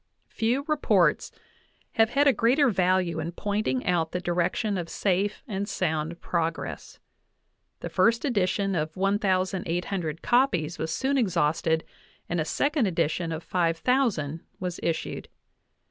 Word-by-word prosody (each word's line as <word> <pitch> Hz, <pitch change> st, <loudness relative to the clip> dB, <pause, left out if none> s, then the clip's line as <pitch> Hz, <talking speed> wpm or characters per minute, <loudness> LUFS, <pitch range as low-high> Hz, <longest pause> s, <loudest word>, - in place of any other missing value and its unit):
Few 240 Hz, +4 st, 0 dB
reports 300 Hz, -1 st, +2 dB, 0.6 s
have 225 Hz, -1 st, +3 dB
had 280 Hz, +4 st, +3 dB
a 280 Hz, -, +6 dB
greater 250 Hz, +6 st, +3 dB
value 185 Hz, -4 st, +1 dB
in 165 Hz, +2 st, -4 dB
"pointing 210 Hz, +7 st, -1 dB
out 170 Hz, -4 st, 0 dB
the 180 Hz, -, 0 dB
direc 175 Hz, -1 st, 0 dB
tion 210 Hz, -2 st, -1 dB
of 175 Hz, -3 st, -4 dB
safe 200 Hz, +1 st, 0 dB
and 200 Hz, -2 st, -3 dB
sound 160 Hz, -1 st, -2 dB
progress. 165 Hz, -1 st, -3 dB, 0.8 s
The -, -, -4 dB
first 230 Hz, +4 st, +2 dB
edition 200 Hz, -5 st, +1 dB
of 155 Hz, 0 st, -2 dB
1,800 185 Hz, -4 st, -1 dB
copies 195 Hz, -, +2 dB
was 160 Hz, 0 st, -2 dB
soon 270 Hz, +8 st, +1 dB
exhausted, 165 Hz, -5 st, +1 dB, 0.4 s
and 175 Hz, -1 st, -1 dB
a -, -, -1 dB
second 285 Hz, -, +1 dB
edition 165 Hz, -1 st, -1 dB
of 160 Hz, +1 st, -4 dB
5,000 170 Hz, -, 0 dB, 0.2 s
was 180 Hz, -2 st, -4 dB
issued. 165 Hz, -1 st, -3 dB
185 Hz, 130 wpm, -26 LUFS, 165-225 Hz, 0.8 s, a